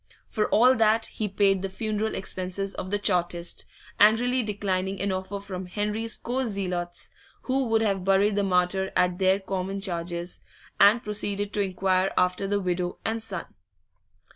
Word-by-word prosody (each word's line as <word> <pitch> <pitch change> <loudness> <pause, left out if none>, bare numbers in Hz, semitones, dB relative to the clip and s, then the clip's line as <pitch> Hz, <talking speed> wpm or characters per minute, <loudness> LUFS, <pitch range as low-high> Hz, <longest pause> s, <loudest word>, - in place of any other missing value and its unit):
For 215 - -1
all 250 +4 +6
that, 225 0 +3
he 215 - -3
paid 195 -1 +2
the 195 - -3
funeral 215 +2 -2
expenses 190 +1 -3
of 185 - -5
the 205 - +1
Chartist 175 -3 0 0.3
angrily 245 +5 +4
declining 195 -3 -2
an 200 0 0
offer 190 +2 -3
from 190 -2 -6
Henry's 210 +4 -2
co 255 +3 -2
zealots, 180 -6 -3 0.3
who 265 0 0
would 225 0 +2
have 195 -3 0
buried 195 +2 +3
the 205 - +2
martyr 190 0 +1
at 180 0 +2
their 190 +1 +3
common 190 0 -3
charges 175 -2 -4 0.4
and 215 +4 +6
proceeded 205 -1 -2
to 205 - +3
inquire 190 0 +1
after 180 +2 +1
the 205 +1 +1
widow 180 -1 -2
and 225 0 -1
son. 195 -6 -2
195 Hz, 160 wpm, -26 LUFS, 185-210 Hz, 0.4 s, all